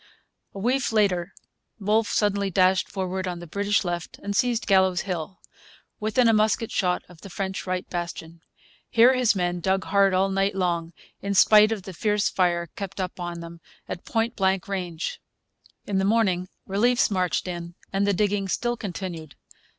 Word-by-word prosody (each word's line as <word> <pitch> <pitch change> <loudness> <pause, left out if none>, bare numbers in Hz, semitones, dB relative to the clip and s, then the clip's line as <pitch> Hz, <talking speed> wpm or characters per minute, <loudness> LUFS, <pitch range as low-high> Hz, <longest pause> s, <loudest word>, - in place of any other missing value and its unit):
A - - -6
week 245 +5 0
later 195 -6 +1 0.5
Wolfe 215 +2 +1
suddenly 200 -1 +1
dashed 185 0 +3
forward 190 -1 -3
on 180 -1 -3
the 175 - -8
British 200 +5 0
left 175 -1 -4
and 200 0 -3
seized 240 0 +1
Gallows 190 -3 +3
Hill, 180 -1 -4 0.6
within 220 +3 +2
a 225 - +5
musket 215 +1 +1
shot 180 -2 0
of 175 -2 -17
the 195 - -10
French 190 +1 -4
right 185 0 -2
bastion. 170 -1 -6 0.5
Here 240 +3 +6
his 250 -4 +2
men 175 -1 -1
dug 190 +2 0
hard 195 -1 +3
all 190 +1 +2
night 195 0 +1
long, 170 -3 -1 0.3
in 200 0 -2
spite 215 +2 +7
of 215 -4 -3
the 190 - -8
fierce 210 +3 +1
fire 175 -2 +1
kept 195 -1 -6
up 185 0 -4
on 175 -1 -5
them 170 0 -10 0.3
at 175 - -6
point 225 +1 -1
blank 190 -2 +1
range. 180 -4 -4 0.6
In 195 -2 0
the - - +1
morning 190 -4 +1 0.2
reliefs 235 +4 +2
marched 185 -1 0
in, 170 -1 -6 0.2
and 200 +1 +1
the 200 - +3
digging 200 0 0
still 240 +5 -1
continued. 175 - -6
195 Hz, 175 wpm, -25 LUFS, 180-210 Hz, 0.6 s, spite